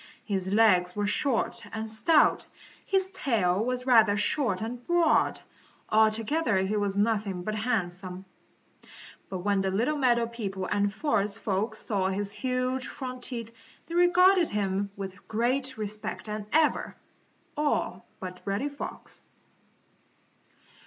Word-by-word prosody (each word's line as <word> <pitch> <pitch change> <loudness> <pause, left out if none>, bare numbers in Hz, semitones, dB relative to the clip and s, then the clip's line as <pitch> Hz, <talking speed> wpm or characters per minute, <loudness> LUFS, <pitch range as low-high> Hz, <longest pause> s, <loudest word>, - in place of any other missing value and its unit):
His 190 -3 -2
legs 185 -5 +4
were 205 0 0
short 235 +4 +1
and 220 0 -4
stout. 295 +9 +3 0.4
His 380 -1 +1
tail 220 - +1
was 250 +1 -2
rather 220 -5 +5
short 210 -2 +1
and 235 +3 -5
broad. 345 -2 +3 0.5
Altogether 220 +4 +2
he 190 +3 -1
was 200 -1 0
anything 205 -4 0
but 215 - -3
handsome. 190 -4 -3 1.0
But 185 -2 -5
when 200 -1 +2
the 190 - 0
little 235 +11 0
meadow 240 -3 +3
people 200 -5 -5
and 205 +1 0
forest 210 -4 0
folks 220 +1 -2
saw 195 -4 0
his 200 +1 -2
huge 255 +2 -1
front 255 -2 -6
teeth 235 -3 -5 0.3
they 335 - -9
regarded 355 +1 +5
him 200 -1 -1
with 195 -1 -8
greater 255 +2 0
respect 210 0 -4
than 210 -1 -5
ever, 310 0 +2 0.6
all 295 0 -1 0.2
but 180 -1 -7
Reddy 200 +9 -1
Fox. 285 - -8
220 Hz, 130 wpm, -28 LUFS, 200-255 Hz, 1.0 s, rather